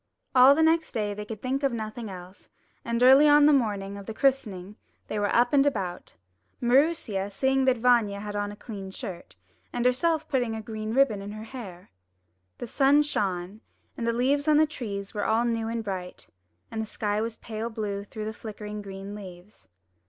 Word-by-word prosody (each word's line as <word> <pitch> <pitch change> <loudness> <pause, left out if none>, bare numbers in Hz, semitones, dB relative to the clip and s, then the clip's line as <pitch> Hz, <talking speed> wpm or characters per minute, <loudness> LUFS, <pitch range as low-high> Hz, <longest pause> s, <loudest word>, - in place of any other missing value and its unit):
All 260 +2 +8
the 320 - +3
the - - +6
next 320 0 +2
day 210 -3 -1
they 210 +1 -6
could 215 -1 -8
think 265 +2 -1
of 275 -2 +1
nothing 220 0 -5
else, 185 0 -11 0.3
and 235 +1 0
early 270 +4 +8
on 295 0 +7
the 300 - +6
morning 200 -6 0
of 200 - -11
the 220 - -6
christening 215 -9 0 0.3
they 215 - -3
were 205 0 0
up 245 +2 +3
and 275 -1 +6
about, 195 -10 -3 0.4
Maroosia 245 - +2
seeing 265 +5 +1
that 260 -1 +3
Vanya 225 -4 +3
had 205 0 -6
on 205 0 -2
a - - -9
clean 200 -3 -8
shirt, 190 -2 -8 0.4
and 245 0 -2
herself 315 +5 +2
putting 245 -5 0
a 220 - -5
green 215 0 -5
ribbon 255 -7 +3
in 200 +1 -7
her 215 0 -7
hair. 200 - -10 0.7
The - - -5
sun 275 +5 +4
shone, 195 -6 -3 0.3
and 230 - -3
the - - +3
leaves 275 +5 +1
on 305 -1 +5
the 310 - +6
trees 205 -9 -6
were 205 - -2
all 225 +2 +2
new 230 -1 -1
and 230 0 -3
bright, 185 -3 -6 0.4
and 220 - -3
the 220 - -4
sky 210 -1 -2
was 225 0 -3
pale 220 +1 -5
blue 205 -3 -4
through 215 +1 -7
the 220 - -4
flickering 210 -1 -7
green 195 0 -8
leaves. 190 -1 -12
220 Hz, 200 wpm, -27 LUFS, 205-260 Hz, 0.7 s, All